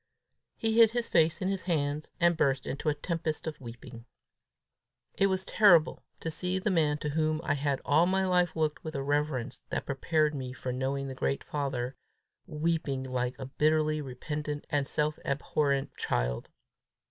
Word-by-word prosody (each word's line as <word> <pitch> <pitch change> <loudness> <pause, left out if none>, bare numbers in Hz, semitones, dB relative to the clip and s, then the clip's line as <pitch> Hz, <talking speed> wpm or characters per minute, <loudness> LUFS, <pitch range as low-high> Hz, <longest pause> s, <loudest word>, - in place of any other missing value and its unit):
He 225 0 +1
hid 225 -1 +9
his 235 +1 -1
face 160 0 +3
in - - 0
his 195 -1 -1
hands, 150 -3 -1
and 170 0 +4
burst 135 -4 +1
into 140 +3 -2
a 150 - +1
tempest 165 -2 -3
of 160 -3 -5
weeping. 115 -1 -10 1.1
It 195 - +3
was 190 0 -1
terrible 175 -7 +5 0.2
to 165 - -3
see 180 +4 -1
the 190 +2 0
man 155 -4 +2
to 150 - -3
whom 155 +1 +1
I - - +1
had 140 -1 -1
all 160 +4 +4
my 190 +1 +2
life 180 -2 +2
looked 155 -2 -1
with 155 -2 -6
a 135 - -2
reverence 140 -3 -1
that - - -2
prepared 150 +2 +1
me 130 -3 -5
for 130 -1 -4
knowing 135 +2 -2
the 135 - -5
great 135 +1 -1
father, 135 -3 -3 0.5
weeping 155 -4 -1
like 125 -1 -2
a 135 - -6
bitterly 155 +2 +1
repentant 145 +2 -5
and 145 -2 +1
self 150 0 -1
abhorrent 140 0 0
child. - - -1
150 Hz, 170 wpm, -30 LUFS, 135-165 Hz, 1.1 s, hid